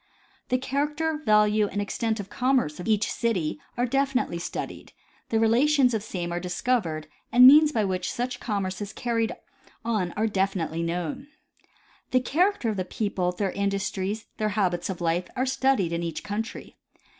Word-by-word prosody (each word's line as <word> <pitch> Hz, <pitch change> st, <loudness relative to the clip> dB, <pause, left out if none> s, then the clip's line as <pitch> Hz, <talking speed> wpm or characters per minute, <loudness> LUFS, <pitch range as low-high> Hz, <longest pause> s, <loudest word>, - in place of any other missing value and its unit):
The 255 Hz, -, +3 dB
character, 295 Hz, +4 st, -1 dB
value 210 Hz, -2 st, +4 dB
and 205 Hz, -, -4 dB
extent 220 Hz, +2 st, -1 dB
of 200 Hz, -, -5 dB
the -, -, -16 dB
commerce 250 Hz, -, +1 dB
of 180 Hz, -, -6 dB
each 215 Hz, -1 st, +2 dB
city 220 Hz, -, -1 dB, 0.2 s
are 245 Hz, -, +2 dB
definitely 270 Hz, -7 st, 0 dB
studied; 170 Hz, -, -6 dB, 0.4 s
the 225 Hz, -, +2 dB
relations 250 Hz, +3 st, +4 dB
of 220 Hz, -, 0 dB
the 215 Hz, -, -11 dB
same 175 Hz, -2 st, -4 dB
are 175 Hz, -, -1 dB
discovered 180 Hz, -4 st, -1 dB, 0.2 s
and 250 Hz, +1 st, +8 dB
means 300 Hz, +3 st, +9 dB
by 220 Hz, -7 st, +1 dB
which 185 Hz, -1 st, -2 dB
such 245 Hz, +1 st, -3 dB
commerce 195 Hz, -3 st, -3 dB
is 205 Hz, +1 st, -5 dB
carried 230 Hz, -1 st, -1 dB, 0.5 s
on 210 Hz, -7 st, 0 dB
are 215 Hz, -, 0 dB
definitely 190 Hz, -6 st, -1 dB
known. 170 Hz, -, -3 dB, 0.8 s
The 255 Hz, -, +3 dB
character 345 Hz, -, +1 dB
of 210 Hz, -, -2 dB
the 185 Hz, -, 0 dB
people, 185 Hz, -3 st, -1 dB
their 190 Hz, +1 st, -2 dB
industries, 200 Hz, +1 st, -2 dB
their 215 Hz, 0 st, 0 dB
habits 180 Hz, -4 st, 0 dB
of 185 Hz, -2 st, -4 dB
life, 170 Hz, +2 st, 0 dB
are 255 Hz, -, +1 dB
studied 265 Hz, -9 st, +1 dB
in 170 Hz, -, -1 dB
each 165 Hz, -2 st, -4 dB
country. 210 Hz, +2 st, -5 dB
210 Hz, 170 wpm, -26 LUFS, 185-250 Hz, 0.8 s, means